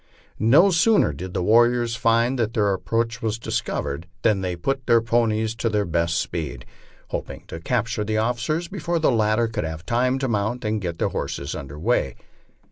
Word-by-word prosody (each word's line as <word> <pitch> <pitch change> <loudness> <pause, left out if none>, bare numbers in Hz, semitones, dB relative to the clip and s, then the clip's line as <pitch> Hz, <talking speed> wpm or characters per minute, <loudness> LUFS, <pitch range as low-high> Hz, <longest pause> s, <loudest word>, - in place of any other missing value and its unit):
No 150 - +5
soon 200 +5 +4
er 75 - -1
did 90 +6 -7
the 90 - 0
warriors 120 +2 +3
find 115 +2 +2
that 115 -1 -1
their 105 -2 +2
approach 115 +5 -1
was 110 -1 -1
discovered 80 -7 -3 0.2
than 105 -4 +3
they 90 -2 -2
put 130 +9 -2
their 115 - +6
ponies 110 -1 +1
to 115 - 0
their 105 -1 0
best 85 0 0
speed, 75 -8 -4 0.4
hoping - - -5
to 80 - -6
capture 115 +3 -1
the 110 +1 -1
officers 125 +9 -1
before 175 -2 -2
the 160 - +3
latter 110 +1 +2
could 110 - -3
have 80 +1 -6
time 125 +2 +1
to 135 0 -1
mount 110 +2 -1
and 105 0 -1
get 85 -3 -4
their - - 0
horses 70 +1 -4
under 70 -2 -7
headway. 80 - 0
110 Hz, 190 wpm, -23 LUFS, 95-120 Hz, 0.4 s, their